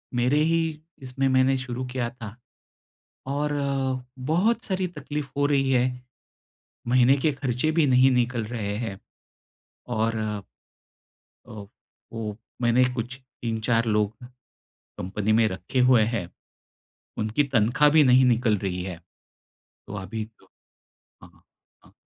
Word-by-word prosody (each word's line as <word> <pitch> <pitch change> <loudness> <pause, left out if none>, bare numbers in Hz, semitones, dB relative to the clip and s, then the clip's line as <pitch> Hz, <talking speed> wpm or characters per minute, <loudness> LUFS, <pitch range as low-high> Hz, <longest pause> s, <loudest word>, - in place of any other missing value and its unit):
मेरे 125 +5 +2
ही 165 +1 +2 0.4
इसमें 135 +1 -1
मैंने 130 +1 +3
शुरू 130 0 -4
किया 125 -2 -2
था 115 -3 -10 0.9
और 145 +2 -1 0.7
बहुत 175 - +1
सारी 185 -2 -1
तक़लीफ़ 150 -3 -6
हो 145 - +2
रही 135 -2 +2
है, 125 0 +1 0.9
महीने 125 +2 +5
के 150 +3 +1
ख़र्चे 135 +2 -1
भी 160 -2 +3
नहीं 130 0 +5
निकल 125 -2 0
रहे 105 -3 -4
हैं। 110 -5 -4 0.9
और 115 0 0 1.3
अ, 105 -2 -9 0.5
वो 110 -2 -5 0.2
मैंने 120 +2 +4
कुछ 125 +1 -4
3-4 115 -2 -2
लोग 105 -1 +1 0.8
कंपनी 100 +3 -2
में 115 0 +4
रखे 95 +8 -3
हुए 120 -4 +6
हैं, 95 -7 -3 0.9
उनकी 110 +7 +1
तनख़्वाह 130 +3 +3
भी 155 0 +6
नहीं 130 -1 +5
निकल 115 -3 +2
रही 90 -2 -3
है। 90 -3 -6 0.9
तो - - -8
अभी 105 +3 -5
तो 95 - -25 0.7
हाँ, - - -14 0.5
हाँ। - - -21
125 Hz, 125 wpm, -25 LUFS, 110-135 Hz, 1.3 s, हुए